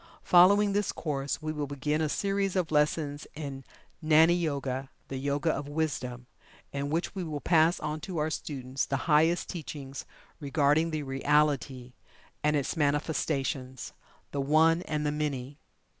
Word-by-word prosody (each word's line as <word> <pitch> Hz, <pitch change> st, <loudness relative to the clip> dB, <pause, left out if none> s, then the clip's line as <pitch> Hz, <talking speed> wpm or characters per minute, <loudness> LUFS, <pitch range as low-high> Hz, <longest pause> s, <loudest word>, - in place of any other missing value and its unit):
Following 200 Hz, +3 st, +6 dB
this 205 Hz, -1 st, +1 dB
course, 140 Hz, -2 st, -3 dB
we 155 Hz, -, -2 dB
will 150 Hz, -2 st, -3 dB
begin 150 Hz, +2 st, -1 dB
a 155 Hz, -, 0 dB
series 195 Hz, +2 st, 0 dB
of 180 Hz, -4 st, 0 dB
lessons 150 Hz, -1 st, 0 dB
in 140 Hz, -3 st, -6 dB, 0.4 s
"GNANI 160 Hz, +2 st, +6 dB
YOGA" 140 Hz, -6 st, -2 dB, 0.2 s
the 135 Hz, -, -4 dB
Yoga 140 Hz, +4 st, 0 dB
of 145 Hz, -1 st, -4 dB
Wisdom 130 Hz, -5 st, -3 dB, 0.5 s
in 140 Hz, 0 st, -2 dB
which 165 Hz, +3 st, -1 dB
we 190 Hz, -3 st, -4 dB
will 155 Hz, -3 st, -4 dB
pass 165 Hz, +2 st, +3 dB
on 150 Hz, +1 st, -3 dB
to 180 Hz, +2 st, -6 dB
our 155 Hz, +1 st, 0 dB
students 135 Hz, -4 st, -3 dB
the 135 Hz, -1 st, -2 dB
highest 160 Hz, +2 st, +3 dB
teachings 145 Hz, -5 st, -6 dB, 0.3 s
regarding 150 Hz, +2 st, +2 dB
the 155 Hz, -2 st, -3 dB
Reality 135 Hz, -2 st, 0 dB, 0.5 s
and 150 Hz, 0 st, +3 dB
its 140 Hz, -2 st, -1 dB
Manifestations 140 Hz, -3 st, -1 dB, 0.4 s
the 140 Hz, -, -1 dB
One 160 Hz, +4 st, +4 dB
and 150 Hz, -1 st, -1 dB
the 150 Hz, -, +1 dB
Many. 145 Hz, -2 st, -3 dB
150 Hz, 150 wpm, -29 LUFS, 140-160 Hz, 0.5 s, Following